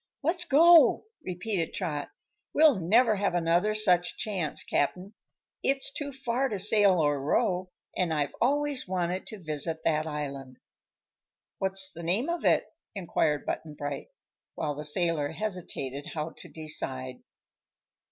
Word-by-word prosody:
"Let's 350 +4 +1
go!" 335 +2 +6 0.2
repeated 180 -1 -3
Trot. 145 -2 -3 0.5
"We'll 300 -8 +6
never 215 +5 +4
have 195 -2 0
another 175 +5 +2
such 180 -5 +2
chance, 185 -8 -2
Cap'n. 185 +8 -1 0.5
It's 275 0 0
too 290 -1 -4
far 265 0 -1
to 210 - -2
sail 200 -2 +4
or 145 -3 +1
row, 180 +5 0 0.3
and 180 -3 0
I've 145 -2 -1
always 285 +1 +1
wanted 180 0 -2
to 215 - -5
visit 155 +1 -2
that 155 -1 +1
island." 140 -4 -5 1.0
"What's 190 0 0
the 170 - -9
name 190 - 0
of 345 0 -2
it?" - - +4 0.3
inquired 160 -5 0
Button 155 -2 -4
Bright, 145 -1 -5 0.5
while 150 -2 -2
the 150 +1 -6
sailor 150 -1 +1
hesitated 165 -9 -4
how 155 +1 -3
to - - -8
decide. 130 -5 -4
180 Hz, 135 wpm, -28 LUFS, 150-215 Hz, 1.0 s, go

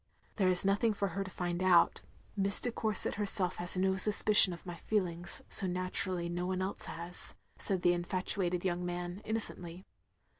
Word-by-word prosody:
"There 195 -4 +2
is 185 0 0
nothing 205 +3 +1
for 200 -1 -1
her 195 +3 -3
to 190 - -9
find 175 -1 -4
out. 180 -2 +4 0.3
Miss 200 -1 +1
de 245 - -2
Cotirset 215 -4 -1
herself 195 -3 -1
has 175 +1 0
no 190 +1 +1
suspicion 210 0 +6
of 170 +1 -10
my 175 - -6
feelings, 175 -2 -3
so 195 - +1
nattirally 185 0 +2
no 175 +1 -3
one 185 0 -2
else 190 - -5
has, 170 +1 -4
" - - -34
said 190 -3 -3
the 175 - +4
infatuated 180 0 -2
young 180 -1 -1
man, 175 +2 -5
innocently. 185 -5 -4
185 Hz, 180 wpm, -32 LUFS, 175-195 Hz, 0.3 s, suspicion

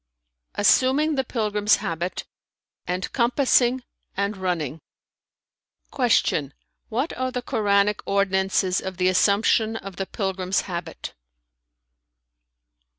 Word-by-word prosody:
"Assuming 265 +8 +3
the 265 -2 0
pilgrim's 210 -4 +1
habit 170 +2 -4 0.6
and 180 +1 -3
compassing 250 0 +2 0.3
and 200 +1 -1
running." 165 -6 -3 1.1
Q 215 - +2 0.4
"What 255 +8 -2
are 255 0 -2
the 250 -1 -4
Koranic 205 -2 +1
ordinances 190 -1 +1
of 190 -1 -6
the 185 0 +2
assumption 215 +4 +2
of 195 -4 -8
the 195 - -3
pilgrim's 190 -2 -1
habit?" 175 -2 -6
200 Hz, 95 wpm, -24 LUFS, 185-240 Hz, 1.1 s, Assuming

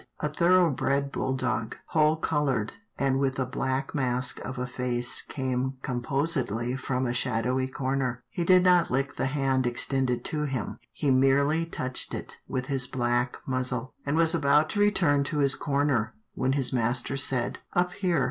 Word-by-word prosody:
A 150 - -1
thoroughbred 150 -4 +2
bulldog, 130 -4 -2
whole 155 0 +3
coloured, 145 -9 0 0.2
and 135 -1 +1
with 135 -1 0
a 130 - 0
black 130 +1 -2
mask 125 -3 0
of 130 - -6
a 125 - -2
face 125 -1 0
came 130 -1 -2
composedly 125 -2 -1
from 130 0 -2
a 120 - -1
shadowy 125 +1 0
corner. 130 -2 -2
He 170 - -2
did 185 +1 +5
not 180 -2 +4
lick 135 +2 -1
the 135 - 0
hand 135 -2 +1
ex 120 0 +1
tended 130 -3 -1
to 150 -1 -2
him, 130 -8 -4
he 140 - 0
merely 140 +5 +3
touched 130 -5 -2
it - - -8
with 130 0 -2
his 130 -2 +1
black 120 0 0
muzzle, 130 -1 -2
and 145 +2 -1
was 165 0 +4
about 150 -1 +3
to 205 - -2
return 170 -9 +3
to 150 - -3
his 140 -2 +3
corner, 140 -5 0 0.2
when 130 0 0
his 135 -3 +1
master 120 +2 0
said, 130 -3 -1
" - - -27
Up 180 0 +2
here." 180 -4 0
135 Hz, 170 wpm, -27 LUFS, 125-150 Hz, 0.2 s, did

